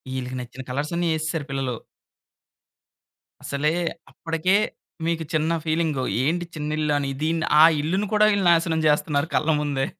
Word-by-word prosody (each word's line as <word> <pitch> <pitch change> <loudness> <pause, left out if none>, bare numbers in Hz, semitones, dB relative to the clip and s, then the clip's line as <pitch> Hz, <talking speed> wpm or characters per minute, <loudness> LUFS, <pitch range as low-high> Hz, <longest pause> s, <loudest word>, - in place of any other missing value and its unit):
ఈళ్ళకి 130 0 -4
నచ్చిన 125 +1 -8
కలర్స్ 145 +5 -2
అన్ని 175 0 0
ఏసరు 155 -1 -3
పిల్లలు. 135 -3 -2 1.7
అసలే 150 +3 0 0.4
అప్పటికే, 165 +5 0 0.5
మీకు 165 -1 -1
చిన్న 155 +1 +1
ఫీలింగు 155 -4 0 0.2
ఏంటి 175 +4 0
చిన్న 150 0 -4
ఇల్లు 150 -1 +1
అని. 140 -1 -2
దీన్ని 165 0 0 0.2
ఆ - - +10 0.2
ఇల్లుని 190 +7 -1
కూడా 215 0 +5
వీళ్ళు 200 -2 +1
నాశనం 165 -1 +2
చేస్తున్నారు 150 0 +1
కళ్ళ 155 - +1
ముందే. 140 -2 -1
155 Hz, 145 wpm, -24 LUFS, 140-165 Hz, 1.7 s, ఆ